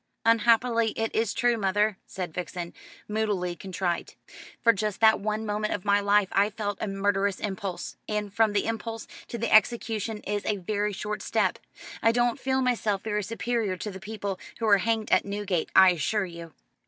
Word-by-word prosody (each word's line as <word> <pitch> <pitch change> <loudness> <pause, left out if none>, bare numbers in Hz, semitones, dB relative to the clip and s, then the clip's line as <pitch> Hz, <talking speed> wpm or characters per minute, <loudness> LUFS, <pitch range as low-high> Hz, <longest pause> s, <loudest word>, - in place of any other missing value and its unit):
"Unhappily 230 0 +3
it 225 0 -2
is 225 -2 +1
true, 240 -1 +1
mother," 205 +1 +2
said 180 -4 -5
Vixen, 175 0 -5 0.3
moodily 205 -5 -1
contrite. 180 -1 -3 0.5
"For 230 - +6
just 210 -1 -2
that 220 -1 +6
one 215 +1 -2
moment 210 0 -1
of 195 - -8
my 200 0 +4
life 205 -1 +3
I 200 +1 +3
felt 205 -2 -4
a - - -1
murderous 195 0 0
impulse 195 -2 -4
and 210 -2 -2
from 220 -1 +3
the 205 - +1
impulse 225 0 -4 0.2
to 235 - -5
the 230 0 -1
execution 220 0 +2
is 205 0 -3
a 210 - 0
very 205 +2 -1
short 210 +1 -4
step. - - 0 0.4
I 225 - +5
don't 240 +2 +1
feel 265 0 0
myself 220 -5 0
very 210 -1 -1
superior 225 -1 -2
to 210 - -5
the 190 - -8
people 200 -1 -5 0.2
who 230 - -2
are 200 -2 +6
hanged 220 +2 -1
at - - +5
Newgate, 200 -4 -2
I 190 -1 +8
assure 190 +5 0
you." 170 -2 -10
210 Hz, 180 wpm, -27 LUFS, 195-225 Hz, 0.5 s, I